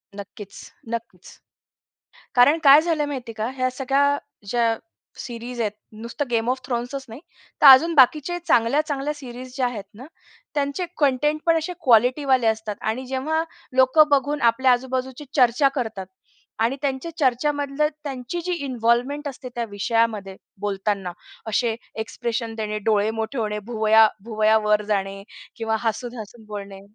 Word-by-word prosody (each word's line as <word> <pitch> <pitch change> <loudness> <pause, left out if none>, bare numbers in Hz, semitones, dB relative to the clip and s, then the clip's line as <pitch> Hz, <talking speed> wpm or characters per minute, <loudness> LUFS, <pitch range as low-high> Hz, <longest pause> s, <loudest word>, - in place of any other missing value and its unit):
नक्कीच, 200 0 -10 0.2
नक्कीच. 230 -6 -7 1.0
कारण 270 +6 +5
काय 280 +2 +9
झालंय 315 -2 0
माहितीये 255 -5 -6
का, 220 +1 -2
ह्या 255 0 0
सगळ्या 275 +2 +1 0.3
ज्या 230 +1 +1 0.4
सिरीज 240 0 -7
आहेत. 210 -2 0 0.3
नुसतं 235 +5 -4
गेम 230 0 0
ऑफ 260 0 -1
थ्रोन्सच 250 +2 -3
नाही, 230 +4 -10 0.4
तर - - +6
अजून 280 +5 +8
बाकीच्या 300 +5 +4
चांगल्या 235 +5 +3
चांगल्या 290 -1 -2
सिरीज 255 -2 -10
ज्या 260 -2 +1
आहेत 225 -5 -5
ना, 245 +6 -11 0.5
त्यांचे 285 +5 -1
कंटेंटपण 295 +4 +2
असे 325 +3 -4
क्वालिटीवाले 255 +1 +3
असतात 220 -1 -1
आणि 225 +4 -2
जेव्हा 280 +5 -1 0.3
लोकं 260 +4 +5
बघून 285 +1 +1
आपल्या 255 +2 +2
आजूबाजूची 260 +2 -2
चर्चा 250 +1 +4
करतात 220 -7 -4 0.5
आणि 230 +4 +1
त्यांच्या 275 +3 -2
चर्चामधली 285 +2 +1 0.2
त्यांची 270 +3 -5
जी 365 - -1
इन्व्हॉल्व्हमेंट 255 +3 0
असते, 260 -1 -8
त्या 235 - -2
विषयामध्ये 210 -2 -1 0.2
बोलताना 200 -2 -2 0.4
असे 225 +1 +1 0.3
एक्सप्रेशन 230 0 -4
देणे, 215 -1 -3
डोळे 210 0 +1
मोठे 225 +3 -4
होणे, 210 -2 -2
भुवया 220 -1 +5 0.2
भुवया 220 -1 +3
वर 210 0 +3
जाणे 195 0 -2 0.3
किंवा 225 -1 -1
हसून-हसून 230 -1 -5
बोलणे. 200 -2 -8
245 Hz, 140 wpm, -23 LUFS, 220-275 Hz, 1.0 s, काय